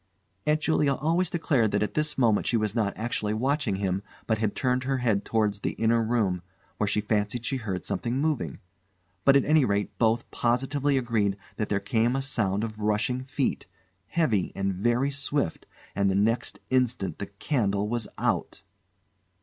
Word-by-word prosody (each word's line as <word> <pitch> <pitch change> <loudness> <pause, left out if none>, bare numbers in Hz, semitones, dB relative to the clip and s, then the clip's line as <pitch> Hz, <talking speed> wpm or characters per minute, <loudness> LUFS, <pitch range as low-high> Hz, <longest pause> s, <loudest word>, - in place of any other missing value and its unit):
Aunt 150 +1 +3
Julia 150 -3 +2
always 165 +5 +1
declared 140 -10 +2
that 100 +1 +1
at 105 - -3
this 150 0 -1
moment 115 -5 +3
she 120 - +2
was 110 -2 0
not 110 -4 0
actually 110 -2 -1
watching 130 -2 0
him, 95 -1 -1 0.2
but 110 -2 0
had 110 -2 0
turned 125 0 +1
her 135 0 0
head 110 -5 +1
towards 105 -3 0
the - - -2
inner 115 +1 +2
room, 110 -6 +1 0.4
where 105 - 0
she 105 +1 +1
fancied 105 +2 -1
she 135 - -1
heard 100 -6 -4
something 120 +2 -2
moving; 140 - -1 0.7
but, 140 - +7
at 140 - +2
any 155 -1 +5
rate, 100 -3 0
both 115 0 +2
positively 135 +4 +1
agreed 110 -6 +1 0.2
that 105 - -2
there 100 - +1
came 115 +4 +1
a 135 - 0
sound 105 -7 0
of 110 -1 -5
rushing 105 +4 0
feet, 135 0 -2 0.4
heavy 115 - +1
and 100 0 0
very 120 +8 +1
swift 140 - -2 0.3
and 100 0 +2
the 95 - +1
next 110 +4 +1
instant 125 -9 +1
the 100 - -4
candle 100 -2 -1
was 115 -1 -2
out! - - -1
115 Hz, 175 wpm, -27 LUFS, 105-135 Hz, 0.7 s, but